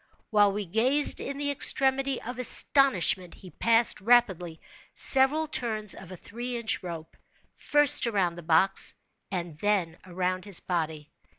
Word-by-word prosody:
While 205 -2 +3
we 205 +1 -5
gazed 250 - 0
in 280 - -6
the 285 0 -2
extremity 270 -1 +2
of 250 +1 -8
astonishment, 215 - +1
he 185 - -15
passed, 230 -2 +2
rapidly, 190 -8 +1 0.4
several 275 +4 +4
turns 220 -8 -2
of 190 -1 -13
a 185 - -10
three 240 +6 -7
inch 230 -2 -3
rope, 165 -3 -9 0.4
first 295 -3 +4
around 195 -6 -1
the 175 - -11
box 170 +4 +1 0.3
and 175 -4 -6
then 190 -5 -2
around 185 +1 -4
his 200 -4 0
body. 160 -4 -5
205 Hz, 140 wpm, -26 LUFS, 180-250 Hz, 0.4 s, several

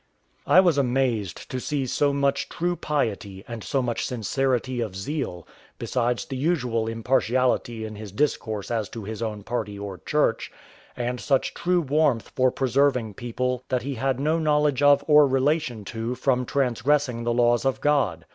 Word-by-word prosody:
I 185 - +7
was 170 -6 +3
amazed 120 -8 -1
to 130 - -2
see 140 +1 -2
so 140 +3 +1
much 140 0 0
true 175 +1 -1
piety, 105 - -2
and 115 -3 -7
so 135 -2 0
much 120 -1 -2
sincerity 125 +1 -1
of 105 -5 -4
zeal, 95 - -4 0.3
besides 120 +1 -1
the 135 - -5
unusual 125 -7 0
impartiality 120 0 0
in 110 -1 -7
his 105 -2 -8
discourse 110 -3 -1
as 110 -3 -1
to 115 - -7
his 110 +2 -6
own 105 -2 -4
party 105 -3 -3
or 100 -3 -7
church, - - 0 0.5
and 125 +1 -2
such 135 -2 +1
true 180 0 +1
warmth 145 - +1
for 130 0 +4
preserving 130 -3 +1
people 125 +3 -3
that 125 -2 0
he 140 +1 -3
had 130 +1 -1
no 155 +4 +1
knowledge 150 -3 +2
of 145 0 +5
or 150 -1 +7
relation 135 -4 0
to 115 +4 -4
from 125 -1 0
transgressing 130 0 +1
the 120 - 0
laws 120 0 +3
of 135 -1 0
God. 135 - +1
125 Hz, 165 wpm, -25 LUFS, 115-140 Hz, 0.5 s, I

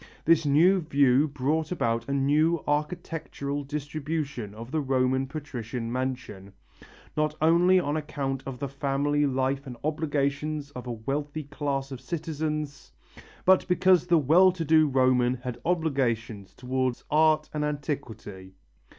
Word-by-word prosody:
This 165 -2 +4
new 170 +7 +5
view 140 -3 +3
brought 145 +3 -1
about 115 -7 -1
a - - -1
new 150 +4 +2
architectural 145 -2 -3
distribution 145 -5 -4
of 115 +3 -9
the 155 0 0
Roman 130 -1 +1
patrician 125 -5 -5
mansion, 125 -7 -4 0.6
not 155 0 0
only 175 +4 +5
on 145 -4 -1
account 140 -3 -3
of 135 -2 -5
the 140 - -3
family 140 +2 0
life 135 +1 -1
and 125 -2 -7
obligations 150 -1 -1
of 125 -2 -8
a - - -3
wealthy 145 +6 -3
class 140 -1 -3
of 130 -2 -7
citizens, 150 -1 -4 0.5
but 190 0 +5
because 180 -1 +3
the 175 -1 +5
well 165 +6 +5
to 170 -3 -4
do 155 0 +5
Roman 130 -2 +3
had 125 -1 -7
obligations 125 - -1
towards 130 -1 -2
art 155 0 +3
and 150 -1 -1
antiquity. 130 -10 -5
145 Hz, 135 wpm, -27 LUFS, 130-155 Hz, 0.6 s, new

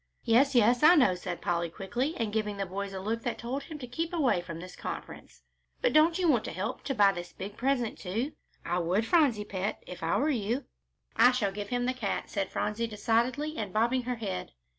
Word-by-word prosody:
"Yes, 255 +4 +4
yes, 240 +1 +5
I 335 +4 +8
know," 260 - +5
said 180 -1 -5
Polly, 170 -1 0
quickly, 240 - -3
and 220 -2 -2
giving 210 -2 -1
the 195 - -1
boys 195 +2 -4
a 190 - -5
look 220 +4 -2
that 240 - -3
told 250 +4 -3
them 315 - -6
to 270 - -7
keep 325 +8 -3
away 270 - +2
from 170 -2 -7
this 180 +1 -9
conference; - - -8 0.4
"but - - +1
don't 320 +2 +5
you 365 -2 +1
want 250 -8 +3
to - - -4
help 185 +6 -4
to 270 - -1
buy 200 -2 +6
this 175 -2 -7
big 200 +2 -7
present, 250 -2 0
too? 225 +10 -2 0.3
I 175 +1 0
would, 180 +6 +1
Phronsie 250 -8 +3
pet, 195 +1 -3
if 180 - -9
I 165 0 +1
were 305 +3 +2
you!" 240 +2 -1 0.5
"I 250 - +7
shall 225 -6 0
give 205 +1 -6
him 245 0 0
the 255 - +1
cat," 230 -6 -3
said 195 -2 -1
Phronsie, 215 +2 -1
decidedly 235 +8 0
and 205 -3 -3
bobbing 235 +5 +2
her 250 0 -3
head. 200 -5 -5
225 Hz, 225 wpm, -29 LUFS, 195-260 Hz, 0.5 s, I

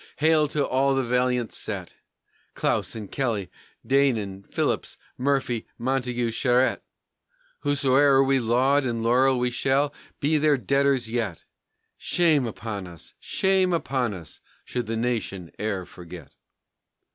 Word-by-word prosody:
hail 155 0 +3
to 145 -1 0
all 135 +1 +2
the 135 - +1
valiant 125 -1 0
set! - - -6 0.6
Clausen, 110 -3 -1
Kelly, 115 -8 -2 0.3
Deignan, 115 -8 +1
Phillips, - - -1 0.2
Murphy, 130 -3 -1
Montagu, 125 -2 -1
Charette! 125 +2 +2 0.8
Howsoe'er 140 -1 +4
we 135 0 +2
laud 130 +4 +2
and 115 -3 -2
laurel 130 +3 +3
we 125 0 0
shall 135 +3 +1 0.3
be 150 +2 +2
their 150 -1 +3
debtors 135 -1 +1
yet! 110 -6 -3 0.6
Shame 155 -7 +2
upon 105 -4 -5
us, 85 -3 -12
shame 190 -1 +1
upon 130 -9 -1
us, 85 -5 -11 0.2
should 125 -3 -3
the 115 0 -2
nation 110 -7 -2
e'er 100 -3 -2
forget! 85 -4 -11
125 Hz, 120 wpm, -25 LUFS, 115-140 Hz, 0.8 s, Howsoe'er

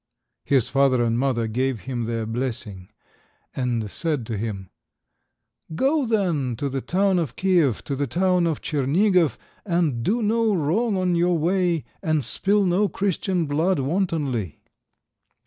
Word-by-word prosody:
His 130 -4 +2
father 135 -2 +3
and 115 0 0
mother 125 -4 0
gave 125 +1 -1
him 120 +1 -4
their 115 -1 -2
blessing, 110 -5 -5 0.7
and 120 -5 -2
said 150 -8 -1
to 110 - -4
him— 100 -3 -5 1.0
"Go, 275 - +1
then, 170 - 0
to 140 +5 -3
the 135 0 -3
town 190 +3 +1
of 155 -8 -3
Kiev, 175 - +2
to 140 - -3
the 140 +1 -1
town 180 +5 +2
of 160 -3 -2
Tschernigof, 160 - +2 0.3
and 170 - 0
do 225 - 0
no 220 0 +2
wrong 190 +7 0
on 185 -1 +1
your 175 0 +2
way, 175 -1 +1 0.2
and 155 -3 0
spill 200 - +1
no 190 +3 +2
Christian 190 -2 -1
blood 160 +6 +1
wantonly." 140 - -2
150 Hz, 145 wpm, -23 LUFS, 125-185 Hz, 1.0 s, father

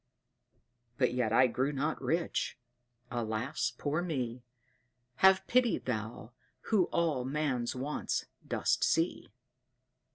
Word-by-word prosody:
But 125 -3 +2
yet 125 -3 0
I 125 +3 +6
grew 130 +3 0
not 150 +3 -2
rich. 165 -5 -1 0.5
Alas, 120 +4 -1
poor 150 +3 -1
me! 130 -8 -3 0.8
Have 190 +3 +5
pity, 245 -2 +3
Thou, 110 -1 -4 0.4
who 200 -5 +5
all 160 -7 0
man's 130 -3 -1
wants 135 +4 -2 0.2
dost - - +1
see. 165 +2 +1
135 Hz, 105 wpm, -32 LUFS, 120-165 Hz, 0.8 s, I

